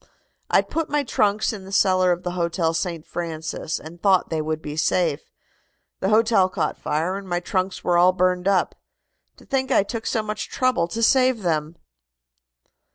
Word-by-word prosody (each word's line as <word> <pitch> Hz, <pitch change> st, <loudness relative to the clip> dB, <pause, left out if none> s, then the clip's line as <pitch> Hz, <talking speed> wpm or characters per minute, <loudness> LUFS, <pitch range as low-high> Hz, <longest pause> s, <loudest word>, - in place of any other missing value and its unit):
"I -, -, +4 dB
put 325 Hz, -1 st, -3 dB
my 295 Hz, 0 st, +1 dB
trunks 215 Hz, -3 st, +1 dB
in 200 Hz, -3 st, -8 dB
the 190 Hz, -, -11 dB
cellar 185 Hz, -2 st, +3 dB
of 175 Hz, +1 st, -2 dB
the 180 Hz, -, -2 dB
Hotel 170 Hz, -1 st, -1 dB
St. 165 Hz, -1 st, -3 dB
Francis 160 Hz, -1 st, -4 dB
and 165 Hz, +2 st, -12 dB
thought 190 Hz, -4 st, +3 dB
they 160 Hz, -1 st, 0 dB
would 155 Hz, 0 st, -2 dB
be 150 Hz, -1 st, -7 dB
safe. 160 Hz, -1 st, 0 dB, 0.7 s
The 190 Hz, -, 0 dB
hotel 215 Hz, -3 st, +4 dB
caught -, -, -2 dB
fire, 165 Hz, +6 st, -2 dB
and 195 Hz, -1 st, -9 dB
my 175 Hz, 0 st, 0 dB
trunks 185 Hz, +1 st, -2 dB
were 175 Hz, -1 st, +2 dB
all 180 Hz, +1 st, +6 dB
burned 180 Hz, 0 st, 0 dB
up. 195 Hz, -2 st, +2 dB, 0.6 s
To -, -, -18 dB
think 265 Hz, -1 st, -1 dB
I -, -, +4 dB
took 225 Hz, +2 st, -5 dB
so 220 Hz, -, 0 dB
much 215 Hz, 0 st, -5 dB
trouble 255 Hz, -10 st, +1 dB
to 230 Hz, +6 st, -3 dB
save 255 Hz, -2 st, +3 dB
them!" 160 Hz, -1 st, -1 dB
185 Hz, 180 wpm, -23 LUFS, 170-210 Hz, 0.7 s, all